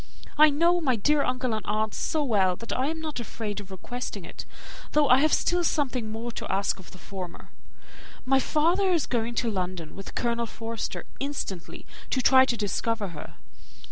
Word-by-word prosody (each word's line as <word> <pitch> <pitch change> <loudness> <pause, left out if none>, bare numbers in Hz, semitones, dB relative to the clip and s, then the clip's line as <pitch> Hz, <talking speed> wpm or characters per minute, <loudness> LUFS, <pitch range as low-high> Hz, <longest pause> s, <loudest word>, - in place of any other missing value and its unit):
I 305 +1 +8
know 340 +4 +3
my 260 -6 +2
dear 290 +7 +3
uncle 255 -2 0
and 215 - -2
aunt 215 0 0
so 310 -2 0
well, 195 -8 +3
that 230 +5 -5
I 260 +2 +1
am 320 +1 -2
not 310 -4 -4
afraid 210 -2 -4
of 200 -2 -10
requesting 200 0 -6
it, - - -8 0.5
though 300 -1 +4
I 255 0 +7
have 310 +2 +3
still 355 0 +2
something 255 -9 0
more 230 +2 -4
to - - -5
ask 195 +1 0
of 190 - -12
the - - -13
former. 185 -2 -8 0.7
My 265 +1 +4
father 340 +8 +2
is 335 -5 +2
going 235 -1 -1
to 230 -2 +1
London 180 -4 -3
with 195 - -9
Colonel 235 -1 0
Forster 225 0 -5
instantly, 270 - -5 0.2
to 260 - +1
try 260 +1 +7
to 240 -2 -1
discover 215 0 -1
her. 165 - -9
235 Hz, 185 wpm, -27 LUFS, 205-285 Hz, 0.7 s, I